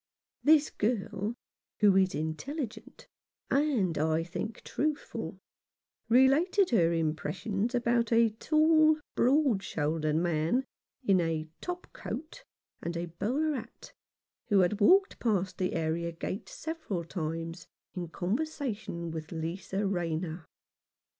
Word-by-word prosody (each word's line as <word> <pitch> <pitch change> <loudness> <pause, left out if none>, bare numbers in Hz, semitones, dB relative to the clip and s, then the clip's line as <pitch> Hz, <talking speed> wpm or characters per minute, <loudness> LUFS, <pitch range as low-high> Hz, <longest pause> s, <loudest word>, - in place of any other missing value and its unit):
This 305 0 +5
girl, 210 -1 -1 0.4
who 205 -3 +5
is 190 -3 +3
intelligent, 210 - -5 0.4
and, 260 - +2
I 160 +1 +2
think, 210 +6 -5
truthful, 305 +1 -3 0.7
related 285 - +4
her 170 -8 +4
impressions 190 +8 -1
about 235 -1 +1
a 230 0 +5
tall, 310 +5 +4 0.2
broad 260 -5 +3
shouldered 155 -2 -1
man, 170 +9 +1 0.4
in 195 -6 +4
a 160 -1 -1
"top 355 0 -4
coat" 325 - -7 0.4
and 170 0 -3
a 170 0 -3
bowler 300 +8 +1
hat, 235 -3 -8 0.5
who 200 -5 +5
walked 385 - +5
past 190 -5 0
the 185 -1 0
area 165 +1 -1
gate 175 +4 -5
several 315 - -4
times 165 0 -4 0.3
in 180 -2 -4
conversation 210 - -3
with 160 -1 -6
Lisa 185 +5 -3
Rayner. 170 -3 -2
195 Hz, 110 wpm, -30 LUFS, 165-265 Hz, 0.7 s, This